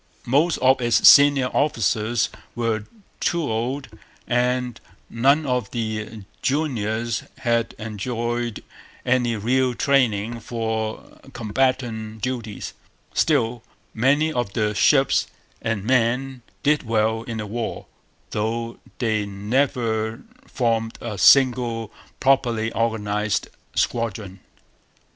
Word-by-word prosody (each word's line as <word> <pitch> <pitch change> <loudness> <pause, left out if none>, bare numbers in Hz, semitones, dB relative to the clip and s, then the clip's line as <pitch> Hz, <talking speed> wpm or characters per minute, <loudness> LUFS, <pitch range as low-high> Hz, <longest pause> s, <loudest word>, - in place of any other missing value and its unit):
Most 145 +7 +2
of 130 0 +4
its 120 -1 +4
senior 145 -2 +7
officers 115 -4 +1 0.3
were 115 -3 -1 0.3
too 170 -1 0
old; 130 +3 -2 0.4
and 125 -1 0 0.3
none 140 +6 +3
of 125 -6 -1
the 110 -2 -4 0.2
juniors 115 -6 -1 0.2
had 115 -1 0
enjoyed 120 +2 -3 0.4
any 125 -2 +2
real 125 +4 +1
training 115 -4 +1
for 110 -1 -4
combatant 110 -2 -1
duties. 120 -5 -4 0.4
Still, 115 +1 +1 0.3
many 145 +7 +2
of 120 -6 -2
the 105 -2 0
ships 135 +6 +3 0.3
and 115 -3 -2
men 125 +2 +1 0.2
did 150 +1 +3
well 110 -1 0
in 115 -1 -6
the 105 - -4
war, 115 +2 -4 0.5
though 115 +2 -2 0.2
they 110 -4 0
never 110 +1 -1 0.2
formed 115 -2 -1
a 115 -3 -5
single 120 -2 +4 0.3
properly 120 -5 +2
organized 105 -2 -1 0.3
squadron. 105 -5 -2
115 Hz, 100 wpm, -23 LUFS, 110-130 Hz, 0.5 s, senior